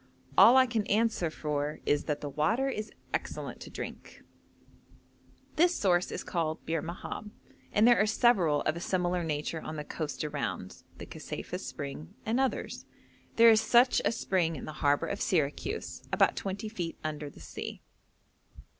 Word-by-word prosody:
All 255 - +8
I 260 - +7
can 230 -4 -1
answer 215 -5 +2
for 150 -1 -3
is 145 - +1
that 150 -2 -2
the 145 - -4
water 215 - +1
is 215 -5 -3 0.2
excellent - - -3
to - - -9
drink. - - -8 1.3
This 345 +2 +4
source 180 -3 +2
is - - -4
called 160 -2 -2
Bir 165 -1 -1
Mahab, 180 +5 -6 0.4
and 215 +3 +4
there 240 -3 +6
are 210 - +3
several 195 -10 +3
of 155 - 0
a - - -4
similar 180 0 0
nature 155 +1 -2
on 155 - -6
the 150 - -4
coast 150 0 -4
around: 120 -12 -4 0.2
the - - -8
Kaseifah - - -6
spring 70 +3 -7
and 230 +4 +1
others. 265 -1 -1 0.5
There 230 0 +8
is 220 0 +5
such 240 +3 +5
a - - +2
spring 180 -7 0
in 135 - -7
the 155 - -6
harbour 145 -1 +3
of 200 - -4
Syracuse, 180 - -1
about - - +3
twenty 195 +2 -4
feet 175 -6 -4
under 150 -1 -4
the - - -16
sea. - - -7
175 Hz, 165 wpm, -30 LUFS, 150-220 Hz, 1.3 s, All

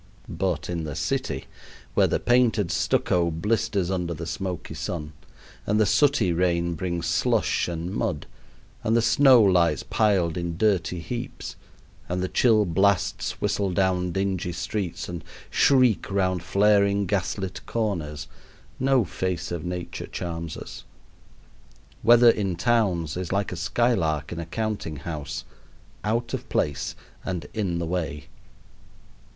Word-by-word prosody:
But 85 -2 -2
in 85 -2 -3
the 75 -3 -5
city - - -2 0.5
where - - +4
the - - 0
painted 120 -7 +2
stucco 85 0 +1
blisters 95 +2 0
under 90 -2 -2
the 85 +2 -6
smoky 90 +1 -4
sun, 75 -3 -5 0.5
and 105 +1 +2
the 110 - +5
sooty 110 -3 +3
rain 85 0 +1
brings 85 0 -3
slush - - +1
and 85 +1 -4
mud, - - -2 0.6
and 115 +2 +2
the 115 - +2
snow 125 0 +6
lies 85 -6 +3
piled 95 -7 +1
in 85 -1 -3
dirty 90 -4 +1
heaps, 120 +7 -6 0.5
and 90 +1 -1
the - - 0
chill 110 0 +3
blasts 95 +2 +1
whistle 100 -2 0
down 90 -1 +1
dingy 95 -1 -1
streets 90 +1 -3
and 85 -2 -6 0.3
shriek 130 -6 +4
round 95 -2 +1
flaring 100 +2 +3
gas 95 0 -1
lit 95 -1 -5
corners, 80 -10 -2 0.5
no 130 -3 +3
face 90 -2 -3
of 85 -3 -3
Nature 90 0 -5
charms 85 -2 -5
us. - - -9 1.2
Weather 120 +1 +7
in 95 -5 -2
towns 95 - +1
is 90 -2 -4
like 100 0 0
a - - -3
skylark 85 - 0
in 85 - -4
a 85 - -5
counting 105 -5 -3
house 75 0 -5 0.6
out 115 +3 -1
of - - -4
place 70 -2 -1 0.3
and 90 -5 -3
in 95 -6 -1
the 85 - -2
way. 80 -4 -3
90 Hz, 140 wpm, -25 LUFS, 85-105 Hz, 1.2 s, Weather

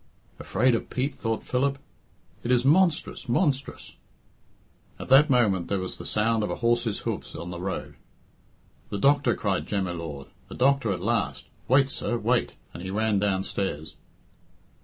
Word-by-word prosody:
"Afraid 125 +5 +2
of 115 - -2
Pete!" 130 +3 -1
thought 115 -3 -3
Philip. 135 +2 0 0.6
"It 120 - -5
is 125 0 +3
monstrous! 160 -4 +2
monstrous!" 140 +1 -1 1.0
At - - -8
that 140 +4 +7
moment 105 -9 +2
there 100 - 0
was 95 -1 -5
the - - -5
sound 110 +1 +1
of 105 - -1
a - - -2
horse's 115 -2 0
hoofs - - -4
on 85 +1 -6
the 85 0 -6
road. 95 0 -5 0.9
"The 100 - -3
doctor," 140 +1 +3
cried 100 -3 -1
Jem 100 -2 -1
y 90 - -3
Lord. 80 -5 -7 0.2
"The - - -9
doctor 135 -4 +2
at 95 - -3
last. - - -1 0.2
Wait, 135 +1 +4
sir, 120 - -2
wait," 120 +2 0 0.2
and 85 - -8
he 95 - -5
ran 105 +1 +1
downstairs. 95 -5 -2
115 Hz, 160 wpm, -26 LUFS, 95-130 Hz, 1.0 s, that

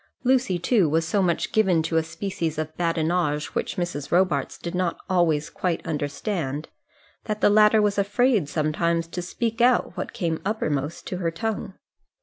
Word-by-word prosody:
Lucy, 250 -7 +2
too, 180 -1 +2
was 160 +2 +1
so 200 +4 +1
much 175 -3 0
given 190 -7 +3
to 165 +1 -2
a 160 - +4
species 165 -1 -4
of 155 0 -4
badinage 165 -2 0
which - - -2
Mrs. 170 -5 -4
Robarts 185 +1 +1
did 170 - -6
not 180 -2 -1
always 165 -6 +1
quite 180 -3 -2
understand, 150 -1 -3 0.6
that 215 -1 -2
the 205 - +4
latter 210 +1 +5
was 205 0 +1
afraid 205 - +2
sometimes 165 +2 0
to 180 +2 -5
speak 230 +6 -3
out 245 -6 +3
what 185 - -4
came 170 -8 -2
uppermost 155 -7 -2
to 180 - -4
her 175 -2 0
tongue. 195 +3 -4
175 Hz, 165 wpm, -24 LUFS, 160-205 Hz, 0.6 s, latter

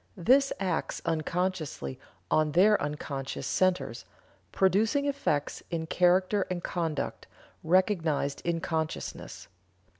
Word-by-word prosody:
This 270 +10 +4
acts 185 -4 -1
unconsciously 165 - -2 0.3
on 155 -1 +2
their 205 +4 +5
unconscious 145 -2 -4
centers, 185 -1 0 0.5
producing 215 - +2
effects 275 - -1
in 165 -2 -2
character 185 +4 +2
and 180 -1 -3
conduct, 160 -5 -3 0.4
recognized 165 -5 +1
in 170 -1 -1
consciousness. 160 -2 -4
175 Hz, 95 wpm, -29 LUFS, 155-190 Hz, 0.5 s, their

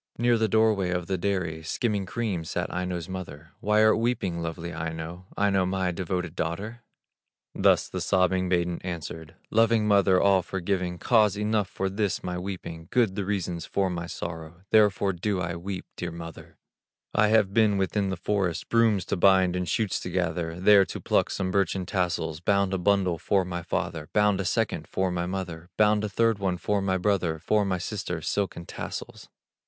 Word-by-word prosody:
Near 120 +1 +3
the 110 - +2
door 110 0 +4
way 95 -3 -1
of 90 -1 -1
the 95 - -1
dairy, 90 -4 -2
Skimming 100 +4 -1
cream, 100 -5 -2
sat 90 +3 -3
Aino's 90 -2 -3
mother. 80 -5 -8
"Why 105 +1 +3
art 110 0 +4
weeping, 105 -8 -1
lovely 85 +1 -5
Aino, 80 +2 -5
Aino, 100 -2 +2
my 95 -1 0
devoted 90 -1 -3
daughter?" 100 +10 -4 0.7
Thus - - +3
the - - -5
sobbing 90 0 +2
maiden 85 -1 0
answered: 80 -2 -6 0.2
"Loving 115 -1 +3
mother, 100 -3 +4
all 100 -2 +4
forgiving, 90 -1 -2
Cause 105 0 +3
enough 105 -1 0
for 95 - -2
this 100 +1 -1
my 90 -1 -3
weeping, 90 -3 -6
Good 115 -6 +2
the 100 0 -3
reasons 90 -4 -2
for 95 -2 0
my 85 -1 -4
sorrow, 85 +1 -7
Therefore 100 -2 +4
do 95 +2 -1
I 85 -1 -2
weep, 90 +2 -5
dear 90 - -4
mother: 85 -1 -10 0.6
I 105 - +4
have 105 -3 +3
been 105 -2 +4
within 95 +1 0
the 95 - -3
forest, 95 -2 -1
Brooms 115 -5 +3
to - - -1
bind 95 -1 +4
and 90 -1 -2
shoots 110 -3 0
to - - -6
gather, 85 -2 -2
There 100 +1 +7
to - - -6
pluck - - +1
some 95 -1 -2
birchen 95 -1 0
tassels; 85 -4 -1
Bound 100 +1 +1
a 95 - 0
bundle 95 -3 +2
for 95 -2 +1
my 90 -1 -4
father, 85 -2 -3
Bound 105 -2 +3
a - - -4
second - - -1
for 95 -1 -1
my 85 0 -2
mother, 90 -2 -5
Bound 105 0 +4
a 105 - -1
third 115 +1 +1
one 95 -2 0
for 100 +2 0
my 95 -1 +1
brother, 90 -4 0
For 105 +6 +1
my 95 -2 0
sister - - -4
silken 95 -4 -2
tassels. - - -7
95 Hz, 185 wpm, -26 LUFS, 85-100 Hz, 0.7 s, There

